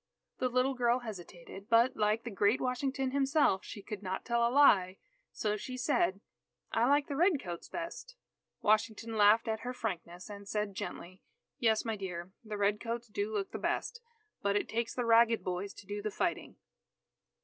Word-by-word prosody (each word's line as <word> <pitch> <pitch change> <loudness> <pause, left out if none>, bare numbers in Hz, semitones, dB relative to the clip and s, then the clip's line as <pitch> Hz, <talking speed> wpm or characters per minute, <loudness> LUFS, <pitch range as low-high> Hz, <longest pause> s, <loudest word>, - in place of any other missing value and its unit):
The 255 - +1
little 255 +2 +2
girl 245 0 +2
hesitated, 195 -2 -9
but 235 +3 +4
like 215 +1 +1
the 235 - -5
great 205 +4 +2
Washington 260 +1 -1
himself, 275 -7 +2
she 205 - -9
could 210 -1 -6
not 190 -1 -4
tell 235 0 +1
a - - +1
lie, 200 -9 +5 0.3
so 210 -1 -1
she 255 +4 -6
said: 235 - +1 0.5
"I 235 - +2
like 285 0 +4
the 285 - -4
Red 340 0 +3
Coats 175 -5 -7
best." 345 +9 -6 0.5
Washington 220 +1 +1
laughed 215 +2 +5
at 220 -1 -1
her 250 +2 -5
frankness, 180 -5 -5
and 200 -1 -9
said 210 -1 -2
gently: 185 -1 -7 0.4
"Yes, 225 -3 +2
my 225 -1 -1
dear, 180 -3 -6
the 215 -2 -5
Red 205 +1 +2
Coats 235 0 -4
do 205 +1 -2
look 200 -2 -2
the - - -5
best, 475 - -2 0.4
but 200 0 +1
it 205 - 0
takes 230 0 -2
the 245 - -1
ragged 230 0 +5
boys 185 +2 -3
to - - -12
do 205 +1 -4
the 215 - -2
fighting." 195 - -2
220 Hz, 180 wpm, -32 LUFS, 200-250 Hz, 0.5 s, lie